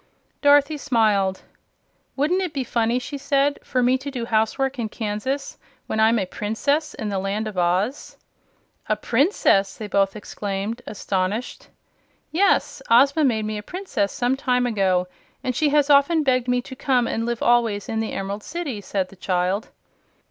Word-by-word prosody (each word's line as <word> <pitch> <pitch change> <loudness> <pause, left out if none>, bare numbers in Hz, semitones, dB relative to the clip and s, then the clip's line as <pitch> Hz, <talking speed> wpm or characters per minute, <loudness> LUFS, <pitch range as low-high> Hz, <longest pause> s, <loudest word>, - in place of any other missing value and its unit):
Dorothy 290 +1 +4
smiled. 205 -7 +1 0.7
"Wouldn't 315 +7 +1
it 360 -4 -3
be 270 - 0
funny," 235 0 0
she 280 +3 -5
said, 280 +1 +1
"for 250 -1 0
me 255 +2 +3
to 280 +2 -6
do 250 -4 -4
housework 240 +4 0
in 225 -2 -2
Kansas, 230 +7 -4 0.3
when 220 - -3
I'm 220 +2 +4
a 195 - 0
Princess 275 - -1
in 220 - -4
the 195 -1 -1
Land 200 +3 -2
of 215 - -6
Oz?" 185 +9 -1 0.7
"A - - +3
Princess!" 230 - +2
they 215 - -6
both 195 -1 +1
exclaimed, 205 +2 -4
astonished. 200 +3 -3 0.6
"Yes; 385 +5 +2
Ozma 275 +6 +5
made 220 -6 +1
me 215 0 -3
a - - -6
Princess 355 - -3
some 245 +2 0
time 250 -2 +1
ago, 190 -6 +1 0.4
and 255 - -2
she 300 +3 +2
has 290 -1 +3
often 290 +3 +4
begged 255 -3 +1
me 250 0 +1
to 260 - -9
come 255 -2 +1
and 225 - -2
live 235 -1 -2
always 230 -4 +2
in 225 - -2
the 225 - -3
Emerald 195 +2 -4
City," 295 -7 -5
said 190 -1 -2
the - - -15
child. 185 +3 -1
235 Hz, 170 wpm, -23 LUFS, 205-275 Hz, 0.7 s, Ozma